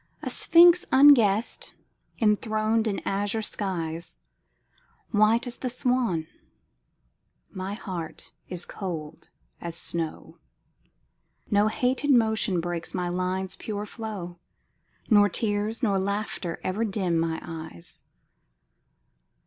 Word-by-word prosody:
A - - -3
sphinx 345 +2 +6
unguessed, 235 -6 +4 0.4
enthroned 220 0 +1
in 200 - -2
azure 205 +2 -1
skies, 170 - -4 0.9
White 215 +3 +3
as 245 0 -6
the 255 - -3
swan, 245 - 0 1.3
my 190 +1 -5
heart 180 -7 -7 0.2
is 180 -1 -2
cold 165 -6 -7 0.3
as 170 -1 -5
snow; 165 -2 -3 1.1
No 205 +1 +4
hated 255 +6 0
motion 220 -6 +3
breaks 170 0 -4
my 180 -1 -1
lines' 185 +1 -2
pure 210 -1 -5
flow, 200 -6 -7 0.7
Nor 205 -2 +5
tears 210 +4 -1
nor 200 -4 +2
laughter 200 -3 -3
ever 195 +5 -1
dim 190 -6 0
mine 165 0 -2
eyes. 160 - -9
205 Hz, 100 wpm, -26 LUFS, 175-225 Hz, 1.3 s, sphinx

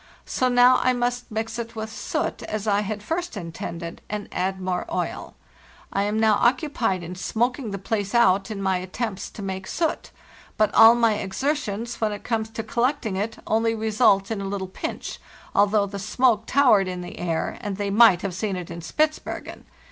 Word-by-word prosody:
So 255 - 0
now 245 +1 +6
I 255 - +3
must 245 0 -2
mix 225 +1 -3
it 230 0 -6
with 220 0 -5
soot, 210 -2 -3
as 215 -1 -4
I 205 -1 +2
had 210 0 -4
first 340 +1 -3
intended, 170 -1 -6
and 210 0 -4
add 190 +1 -1
more 185 -1 -2
oil. - - -3 0.6
I 195 - +1
am 210 +1 0
now 220 -2 +4
occupied 240 - +1
in 170 +2 -6
smoking 240 +6 -1
the 200 - -4
place 205 +1 -2
out 195 -4 +4
in 200 -2 -4
my 190 -1 +2
attempts 190 +3 -4
to 205 - -9
make 190 -1 -4
soot; 325 -2 -1 0.5
but 215 -1 +2
all 225 +1 +9
my 230 -2 +3
exertions, 235 0 -2
when 215 -1 +1
it 205 - -6
comes 225 -2 -1
to 225 0 -5
collecting 235 -1 0
it, 215 +4 -2
only 225 +1 +1
result 215 -2 +2
in 210 -3 -2
a - - -4
little 195 -1 -3
pinch, 185 - -5 0.3
although 205 0 +3
the 200 0 -6
smoke 225 +2 +2
towered 245 -9 +4
in 180 -1 -4
the 175 - -8
air, 170 -2 -2
and 205 -4 -4
they 200 -1 -2
might 205 -4 +6
have 200 -2 -2
seen 195 +2 -2
it 180 -2 -6
in 170 - -6
Spitzbergen. 305 - -2
215 Hz, 190 wpm, -24 LUFS, 195-235 Hz, 0.6 s, all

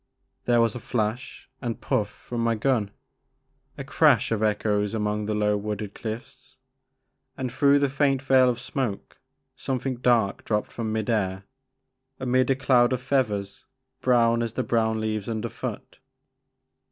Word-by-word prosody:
There 120 -1 +4
was 115 -2 +2
a 125 - -6
flash 115 +1 -3
and 120 -3 -3
puff 105 -1 0
from 115 +2 -5
my 115 0 +2
gun, 110 -3 +1 0.9
a - - -5
crash - - +3
of 110 -2 0
echoes 105 -1 0
among 105 -1 -1
the 110 - -1
low 105 0 +2
wooded 105 -1 -4
cliffs, 115 +3 -8 0.8
and 130 -2 -3
through 140 +3 +4
the 140 0 +2
faint 135 0 +1
veil 130 -1 +4
of 120 -1 -2
smoke 120 - -4 0.4
some 130 - -2
thing 130 0 -3
dark 120 -5 +2
dropped 105 -1 -1
from 115 -2 -3
mid 110 -1 -2
air 95 -4 0 0.8
amid 130 0 +1
a 135 - +4
doud 130 -2 +3
of 130 - -2
feathers, 105 -8 -1 0.4
brown 120 -2 +3
as 115 -2 -2
the - - -1
brown 110 -1 +1
leaves 110 -1 -2
under 115 +1 -3
foot. - - -7
115 Hz, 155 wpm, -25 LUFS, 105-130 Hz, 0.9 s, There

